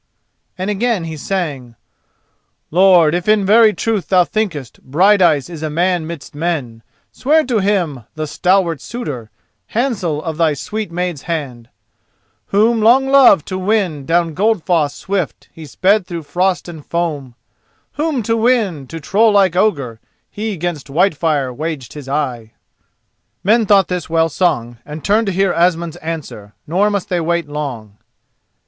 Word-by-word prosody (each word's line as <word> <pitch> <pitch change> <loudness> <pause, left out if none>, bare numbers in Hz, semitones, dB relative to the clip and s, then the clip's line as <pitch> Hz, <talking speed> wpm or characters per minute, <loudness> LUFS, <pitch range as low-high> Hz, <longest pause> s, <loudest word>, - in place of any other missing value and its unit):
And 185 +3 -2
again 215 -2 0
he 160 -1 -5
sang: 145 -8 -4 1.0
"Lord, 175 -2 +5
if 175 +2 -2
in 210 -2 +3
very 220 +2 +6
truth 210 -4 -2
thou 185 -2 +4
thinkest 175 - -4
Brighteyes 170 -1 +3
is 170 -3 -9
a 155 - -2
man 175 +1 0
midst 165 -3 -8
men, 145 -8 -3 0.3
Swear 310 +4 +2
to 245 -4 0
him, 175 - -1
the 155 0 -3
stalwart 175 -1 +1
suitor, 140 - -6 0.4
Handsel 195 - -1
of 160 -2 -4
thy 160 -3 +2
sweet 210 +5 -5
maid's 175 -3 -3
hand: 135 -9 -5 0.8
Whom, 220 +3 +2
long 255 +5 +4
loved, 265 - +6
to 185 -1 -3
win, 185 -8 -1
down 165 -1 +1
Goldfoss 175 -7 +1
Swift 190 -5 -4
he 160 -2 -10
sped 190 +6 +1
through 170 -2 -5
frost 180 +4 -1
and 160 -4 -9
foam; 150 -8 -3 0.6
Whom, 295 -5 -2
to 225 +2 0
win, 220 - +1
to 165 - -7
troll 215 +8 +3
like 195 -4 +3
Ogre, 140 - 0 0.3
He, 210 -2 -4
'gainst 165 -3 -4
Whitefire, 150 -4 +1
waged 150 -2 -5
his 145 -3 -9
eye." 125 -6 -3 0.9
Men 220 +2 +3
thought 200 -1 +4
this 180 -3 -4
well 165 0 +2
sung, 120 -10 -1
and 150 +1 -9
turned 215 +2 +2
to - - +1
hear 190 0 +1
Asmund's 170 -1 0
answer, 155 -11 -7
nor 190 +7 +1
must 200 -3 -2
they 180 - 0
wait 170 0 -1
long. 125 -9 -6
175 Hz, 150 wpm, -17 LUFS, 150-200 Hz, 1.0 s, very